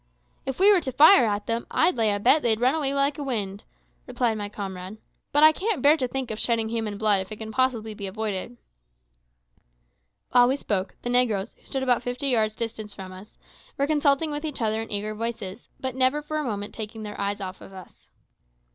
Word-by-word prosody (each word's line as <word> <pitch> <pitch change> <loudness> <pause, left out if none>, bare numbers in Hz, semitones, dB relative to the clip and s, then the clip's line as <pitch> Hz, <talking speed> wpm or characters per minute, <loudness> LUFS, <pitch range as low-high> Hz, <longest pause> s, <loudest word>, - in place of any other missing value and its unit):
"If 265 - -3
we 400 +2 +7
were 370 - +3
to 265 - -4
fire 285 - +7
at 205 0 -2
them, 230 +1 -2
I'd 335 0 +2
lay 225 -3 +2
a 205 - -1
bet 255 +8 +4
they'd 220 -4 +1
run 255 +3 +3
away 295 -4 0
like 280 +1 +1
the 290 - -4
wind," 205 -7 -3 0.4
replied 240 -3 0
my 205 -1 -4
comrade; 190 -1 -7 0.3
"but 290 +1 +4
I 310 - +9
can't 395 +2 -2
bear 290 +2 +7
to 260 -4 0
think 260 -1 -4
of 215 - -5
shedding 225 -2 +1
human 220 -3 -3
blood 205 -2 +2
if 190 - -9
it - - -4
can 220 0 -7
possibly 230 -3 0
be 200 -1 -6
avoided." 215 +3 -4 1.7
While 245 0 +6
we 260 - +2
spoke, 200 -8 -2
the 245 - -2
negroes, 230 -5 +1
who - - -28
stood 265 -1 -2
about 245 -3 +2
fifty 245 +3 -1
yards 215 -3 +2
distant 220 -2 -5
from 190 -1 -8
us, 190 +3 -13 0.4
were 280 - +2
consulting 295 0 +2
with 295 +1 -4
each 305 -3 -4
other 220 -1 0
in 225 - -8
eager 210 +1 -2
voices, 220 -2 -5
but 260 -1 -3
never 260 +3 +1
for 310 +1 -3
a - - -2
moment 205 -5 -4
taking 220 0 -6
their 210 -1 -6
eyes 200 0 -1
off 190 -1 -7
us. 190 -1 -13
230 Hz, 215 wpm, -25 LUFS, 210-270 Hz, 1.7 s, I